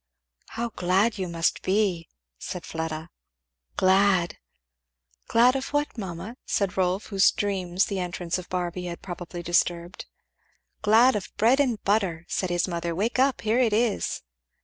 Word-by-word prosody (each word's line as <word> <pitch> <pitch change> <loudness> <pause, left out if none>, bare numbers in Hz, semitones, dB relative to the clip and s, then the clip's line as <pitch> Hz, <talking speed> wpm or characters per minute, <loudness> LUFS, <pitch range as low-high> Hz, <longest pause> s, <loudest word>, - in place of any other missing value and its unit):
"How 235 +1 -1
glad 195 +2 +1
you 185 - -2
must 165 -1 0
be!" 190 -4 0 0.3
said 180 - -6
Fleda. 160 0 -5 0.7
"Glad! 190 -2 +3 0.4
" - - -43
"Glad 245 +3 +5
of 270 +1 -4
what, 290 0 0
mamma?" 195 +2 -6
said 200 -1 -1
Rolf, 185 +1 0
whose 195 0 +6
dreams 190 -2 0
the 200 -2 -3
entrance 180 -1 -3
of 180 - -10
Barby 180 0 -3
had 170 -1 -6
probably 175 -1 -7
disturbed. 175 +1 0 0.7
"Glad 225 +4 +5
of 205 - -4
bread 240 +5 +4
and 250 -6 +1
butter," 190 -5 0
said 185 - -2
his 175 0 +1
mother; 170 -1 -3
"wake 225 +7 -1
up 265 -1 +2
here 220 +3 +1
it 235 -4 +3
is." 225 -1 0
185 Hz, 150 wpm, -26 LUFS, 175-215 Hz, 0.7 s, whose